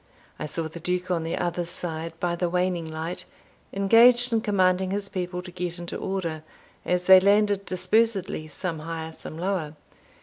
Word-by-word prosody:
I 155 Hz, -, -3 dB
saw 160 Hz, +2 st, -3 dB
the 160 Hz, +2 st, -9 dB
Duke 180 Hz, +2 st, -2 dB
on 170 Hz, -2 st, +1 dB
the 165 Hz, +1 st, -3 dB
other 175 Hz, 0 st, -1 dB
side, 165 Hz, -1 st, -4 dB
by 175 Hz, -1 st, 0 dB
the 175 Hz, 0 st, -1 dB
waning 180 Hz, -2 st, -1 dB
light, 160 Hz, +3 st, -5 dB, 0.5 s
engaged 235 Hz, +5 st, +5 dB
in 225 Hz, -, +2 dB
commanding 185 Hz, -3 st, +2 dB
his 200 Hz, +1 st, -2 dB
people 180 Hz, -1 st, -4 dB
to 180 Hz, -, -10 dB
get 175 Hz, -1 st, -4 dB
into 175 Hz, 0 st, -6 dB
order, 170 Hz, -5 st, -3 dB, 0.4 s
as 180 Hz, 0 st, 0 dB
they 190 Hz, +1 st, +9 dB
landed 200 Hz, 0 st, +2 dB
dispersedly, 185 Hz, -2 st, +1 dB
some 165 Hz, +1 st, -4 dB
higher, 160 Hz, 0 st, -6 dB
some 155 Hz, -, -8 dB
lower. 175 Hz, -4 st, -2 dB
180 Hz, 170 wpm, -25 LUFS, 165-195 Hz, 0.5 s, they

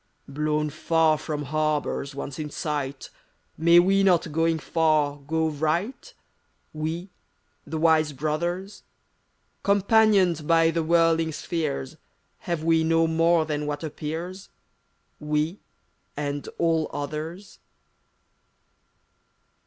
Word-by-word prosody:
THIBD -, -, -15 dB
VOICE 140 Hz, -, -11 dB
Blown 150 Hz, 0 st, 0 dB
far 160 Hz, 0 st, +2 dB
from 150 Hz, -1 st, -4 dB
harbors 150 Hz, -1 st, -1 dB
once 140 Hz, +1 st, -6 dB
in 150 Hz, -1 st, -4 dB
sight, 145 Hz, -3 st, -4 dB, 0.4 s
May 170 Hz, +2 st, +5 dB
we 195 Hz, +3 st, +5 dB
not, 175 Hz, -4 st, +3 dB
going 165 Hz, +1 st, +1 dB
far, 155 Hz, -2 st, +1 dB
go 160 Hz, +3 st, -1 dB
right, 160 Hz, -, -2 dB, 0.3 s
— -, -, -44 dB
We, 160 Hz, +4 st, -4 dB, 0.6 s
the 160 Hz, +2 st, -4 dB
Wise 155 Hz, -1 st, +3 dB
Brothers? 170 Hz, +7 st, -3 dB, 0.8 s
Companioned 200 Hz, -5 st, +3 dB
by 165 Hz, -1 st, +4 dB
the 165 Hz, 0 st, 0 dB
whirling 165 Hz, 0 st, +2 dB
spheres, 155 Hz, -, -3 dB, 0.5 s
Have 170 Hz, -2 st, -1 dB
we 165 Hz, 0 st, +3 dB
no 165 Hz, 0 st, +3 dB
more 165 Hz, 0 st, +3 dB
than 150 Hz, -1 st, -3 dB
what 145 Hz, +1 st, -4 dB
appears 165 Hz, +5 st, -6 dB, 0.4 s
— -, -, -45 dB
We, 150 Hz, +4 st, -1 dB, 0.6 s
and 145 Hz, -1 st, -3 dB
all 165 Hz, -2 st, +1 dB
others? 155 Hz, +7 st, -6 dB
160 Hz, 115 wpm, -25 LUFS, 150-170 Hz, 0.8 s, May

